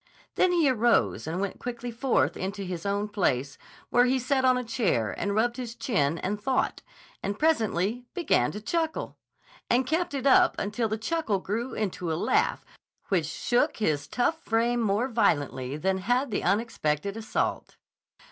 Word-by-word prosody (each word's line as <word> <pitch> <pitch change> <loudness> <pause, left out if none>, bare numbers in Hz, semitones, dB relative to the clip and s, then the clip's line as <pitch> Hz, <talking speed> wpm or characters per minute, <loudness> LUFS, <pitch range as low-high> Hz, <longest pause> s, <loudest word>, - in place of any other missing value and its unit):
Then 370 - +3
he 335 -4 +3
arose 215 - +2
and 165 +3 -2
went 200 0 -3
quietly 240 0 -5
forth 250 +3 +1
into 200 +2 -4
his 180 -1 -4
own 200 +1 0
place, 140 - -1 0.3
where 245 +1 +5
he 255 +1 +2
sat 260 +1 0
on 255 -1 +4
a 250 - -2
chair 195 - 0
and 200 0 -2
rubbed 240 +3 +1
his 240 -2 -5
chin 170 - 0
and 205 +5 -3
thought, 260 +4 0 0.4
and 200 +1 -3
presently 230 - +1
began 355 -3 +2
to 210 - -6
chuckle, 325 +7 -2 0.5
and 250 +2 +3
kept 320 +2 -1
it 270 - -3
up 270 - +5
until 215 +3 -1
the 220 - -1
chuckle 225 -2 -1
grew 230 +6 -3
into 180 -5 -2
a - - 0
laugh 160 - +1 0.4
which 175 -6 +1
shook 240 +9 0
his 150 -9 0
tough 320 - 0
frame 235 0 +1
more 215 +3 +1
violently 145 - 0
than 190 +4 0
had 245 +6 0
the - - -1
unexpected 200 -3 0
assault. 225 -1 -2
220 Hz, 165 wpm, -27 LUFS, 190-250 Hz, 0.5 s, where